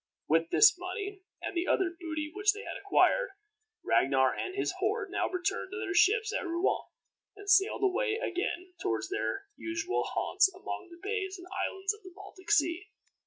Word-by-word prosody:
With 165 +2 +2
this 420 -4 +6
money 390 +2 -5 0.2
and - - -4
the 345 +1 0
other 375 -3 +2
booty 315 -3 -4
which 410 +1 +3
they 425 +2 -8
had - - -6
acquired, 405 +3 +2 0.5
Ragnar 130 -1 +3
and 375 -1 -4
his 395 - 0
horde 405 0 -1
now - - 0
returned 365 0 -2
to - - -4
their 395 -3 -3
ships 430 +4 +4
at - - -1
Rouen, 345 +1 0 0.5
and 405 0 -12
sailed 400 0 +4
away 425 +4 +2
again 365 -4 -3
toward - - -1
their 395 0 -2
usual 335 +2 -2
haunts 385 -1 +2
among 380 0 -6
the 340 0 -13
bays 405 -3 -2
and 355 - -11
islands 385 +2 -1
of 420 - -15
the 370 -3 -12
Baltic 390 -1 -12
Sea. 375 -2 +2
385 Hz, 175 wpm, -30 LUFS, 355-410 Hz, 0.5 s, this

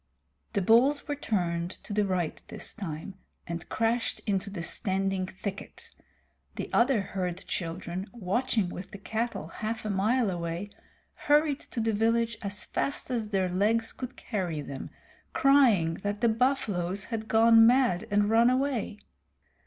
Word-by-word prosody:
The 200 - +1
bulls 255 +8 +4
were 290 - -1
turned, 175 -10 -1
to - - -6
the 205 -1 +2
right 180 -4 -1
this - - -7
time, 190 -1 -6 0.3
and 170 -1 -6
crashed 230 +1 0
into 200 -1 -1
the 185 -4 -5
standing 190 0 -1
thicket. 195 +1 -7 0.6
The - - -5
other 240 -2 +4
herd 185 -1 -4
children, 175 +2 -4
watching 225 -1 0
with 180 +1 -7
the 200 - -9
cattle 225 +4 -3
half 220 0 -4
a 215 - -1
mile 215 +3 +2
away, 170 +3 -4 0.4
hurried 295 -1 +2
to - - -7
the 225 0 +1
village 230 +2 +2
as 205 0 -3
fast 275 -1 -2
as 225 -4 -1
their 190 -3 +1
legs 215 +5 +1
could 255 0 -7
carry 180 -8 -3
them, 140 -1 -7 0.4
crying 245 -12 +5
that 205 +1 -3
the 235 - +4
buffaloes 210 -6 0
had 220 0 -4
gone 225 0 +7
mad 240 -6 +3
and 205 0 +3
run 230 +2 +5
away. 255 -5 0
210 Hz, 150 wpm, -28 LUFS, 185-235 Hz, 0.6 s, gone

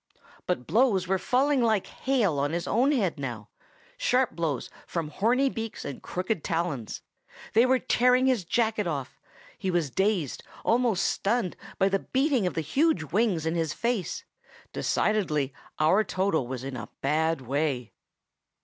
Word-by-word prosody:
But 125 - -1
blows 215 - +2
were 190 0 +1
falling 265 +6 +2
like 220 -4 +2
hail 225 - 0
on 145 +3 0
his 170 0 -2
own 255 +6 +3
head 195 - 0
now,—sharp 250 - -3
blows 160 -6 -2 0.2
from 165 -3 -3
horny 240 - +2
beaks 225 -4 -5
and 140 -2 -6
crooked 185 -1 -2
talons. 165 -9 -2 0.5
They 230 +3 +5
were 260 0 +4
tearing 250 +1 +3
his 255 -7 +2
jacket 220 +1 0
off. 135 -4 -4 0.4
He 190 - -2
was 170 -6 0
dazed, 190 - 0 0.2
almost 230 -5 +2
stunned, 205 -3 0 0.2
by 195 - +3
the 195 0 +1
beating 265 -5 +1
of - - -3
the 165 - 0
huge 175 - +1
wings 195 -7 +2
in 160 - 0
his 165 -3 -1
face. 235 -5 -2 0.5
Decidedly, 155 -11 0 0.2
our 170 +8 +4
Toto 185 - 0
is 130 -1 -4
in 135 -1 -5
a 105 -5 -6
bad 160 +2 +1
way. 135 -2 -1
185 Hz, 150 wpm, -27 LUFS, 155-235 Hz, 0.5 s, They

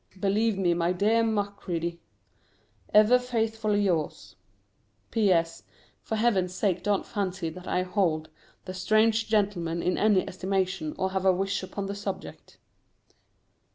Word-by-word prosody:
Believe 205 +2 +1
me, 180 -3 +2
my 170 +1 +1
dear 215 +5 +2
Macready, 200 -6 -2 0.9
Ever 215 +4 +6
faithfully 225 -4 0
yours. 170 -6 -2 0.8
P.S. 170 -6 +2 0.4
For 220 - -3
Heaven's 195 -5 +1
sake 185 -4 0
don't 205 +1 0
fancy 190 -5 -3
that 180 +2 -11
I 180 - 0
hold 180 -5 0 0.4
"The 185 - -6
Strange 215 +4 +2
Gentleman" 190 -6 0
in 180 - 0
any 205 -3 +3
estimation, 185 -3 -2
or 190 0 -1
have 190 -1 -1
a - - +7
wish 195 +2 -1
upon 190 +1 -5
the 200 - -4
subject. 200 -1 -7
195 Hz, 130 wpm, -27 LUFS, 180-215 Hz, 0.9 s, a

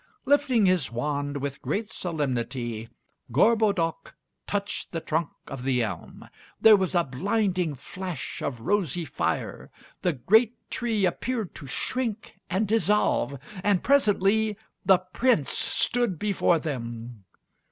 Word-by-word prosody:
Lifting 275 -6 +3
his 185 -8 +2
wand 145 +3 -2
with 140 0 -4
great 210 +2 -2
solemnity, 125 - -3 0.4
Gorbodoc 200 - +2 0.3
touched 205 0 -3
the 165 - -1
trunk 160 0 -1 0.2
of 135 -2 -7
the 125 -2 +1
elm. 95 -7 -6 0.3
There 220 -1 +8
was 190 -2 0
a 175 - +4
blinding 180 - 0
flash 180 +1 -6
of 125 -5 -3
rosy 175 - 0
fire; - - -3 0.3
the 175 - +1
great 220 - +3 0.2
tree 220 -4 0
appeared 225 +2 -2
to 140 - -10
shrink 225 - -3
and 190 +4 +1
dissolve, 210 -9 +2 0.3
and 200 -3 +2
presently 215 -5 +3 0.3
the 190 -2 +6
Prince 185 - +1
stood 240 -7 0
before 200 -3 +2
them. 120 -7 -5
180 Hz, 120 wpm, -26 LUFS, 140-210 Hz, 0.4 s, There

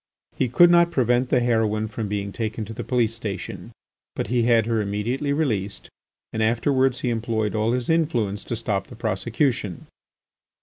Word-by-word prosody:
He 130 - 0
could 175 +8 +6
not 170 0 +5
prevent 125 -2 +1
the 125 - +3
heroine 110 -2 +1
from 110 0 -4
being 100 0 -3
taken 110 +1 -3
to 115 - -8
the - - -5
police 120 -3 +1
station; 105 -4 -6 0.4
but - - -2
he 120 0 +2
had 115 -2 +3
her 115 -1 0
immediately 110 +8 -2
released 110 -10 -1 0.4
and 110 - -1
afterwards 125 +3 +2
he 125 - 0
employed 110 -2 -1
all 110 +2 +1
his 125 -1 -1
influence 120 -12 0
to 120 - -3
stop 100 -4 -2
the - - -11
prosecution. 110 - -1
115 Hz, 170 wpm, -24 LUFS, 105-125 Hz, 0.4 s, could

